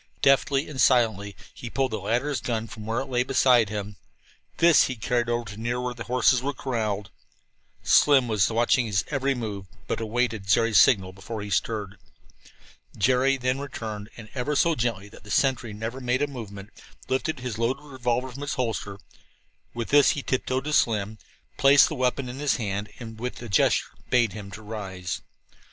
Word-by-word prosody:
Deftly 140 +1 +3
and 135 -4 -3
silently 110 -7 +3 0.2
he 120 - -8
pulled 135 +1 -1
the 110 - -2
latter's 125 +6 -1
gun 115 -2 -2
from 110 -1 -10
where 115 +3 -1
it - - -4
lay 125 -2 0
beside 125 -4 +4
him. 105 -1 -5 0.6
This 170 -2 +6
he 130 - -3
carried 120 +1 -1
over 120 0 -1
to 105 - -10
near 120 +2 -2
where 125 0 -3
the 120 -1 -8
horses 125 0 +3
were 140 +1 -3
corralled. 105 -7 -3 0.7
Slim 140 -3 +5
now 115 - -4
was 105 -3 +3
watching 120 +1 +2
his 95 -3 0
every 140 -1 0
move, 105 -5 -5 0.2
but - - -3
awaited 110 -2 -1
Jerry's 110 +4 +5
signal 95 -6 +3
before 105 +3 -7
he 100 - -7
stirred. 105 -1 -2 1.0
Jerry 130 +5 +3
then 130 +1 -1
returned, 110 -7 -6
and, 115 -2 -10 0.3
so 170 +3 +3
gently 115 -7 -2
that - - -15
the - - -13
sentry 130 -4 +1
never 110 +5 -5
made 125 +2 0
a - - +1
movement, 105 -6 -9 0.4
lifted 130 +2 -1
his 120 -4 -5
loaded 120 +5 -1
revolver 130 -2 -2
from 135 +3 -9
its 145 - -3
holster. 110 -5 -3 0.8
With 115 -1 -4
this 145 -1 +6
he 140 - -3
tiptoed 130 0 -1
to 150 +1 -3
Slim, 110 -4 +1 0.4
placed 140 +1 +6
the - - -4
weapon 130 -1 -1
in 125 +2 -7
his 145 -2 +1
hand 105 -2 -3
and 115 -2 -9
with 125 +2 -5
a 120 - -7
gesture 100 - +3 0.2
bade 120 -5 +3
him 105 -2 -8
rise. 100 -5 -6
120 Hz, 180 wpm, -25 LUFS, 105-130 Hz, 1.0 s, This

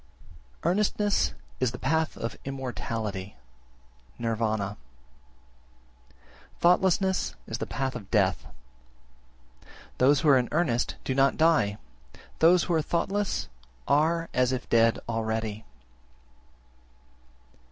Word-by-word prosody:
Earnestness 205 +3 +1 0.2
is 125 -2 0
the - - -5
path 160 +4 0
of 115 - -4
immortality 115 -8 -5 0.8
(Nirvana), 110 -3 -1 1.8
thoughtlessness 190 +1 +2
the 110 - -4
path 135 -1 -3
of 100 - -8
death. 95 -4 +1 1.5
Those 135 +1 +4
who 155 - +3
are 135 -2 +7
in 125 - -2
earnest 145 -7 0
do 130 - -1
not 135 +1 +3
die, 155 -11 +3 0.6
those 170 +2 +5
who 175 - -1
are 160 - +3
thoughtless 195 +6 -1 0.4
are 165 +4 +2
as 125 0 +2
if 130 -1 -3
dead 115 0 +4
already. 110 -1 -2
130 Hz, 100 wpm, -27 LUFS, 115-165 Hz, 1.8 s, are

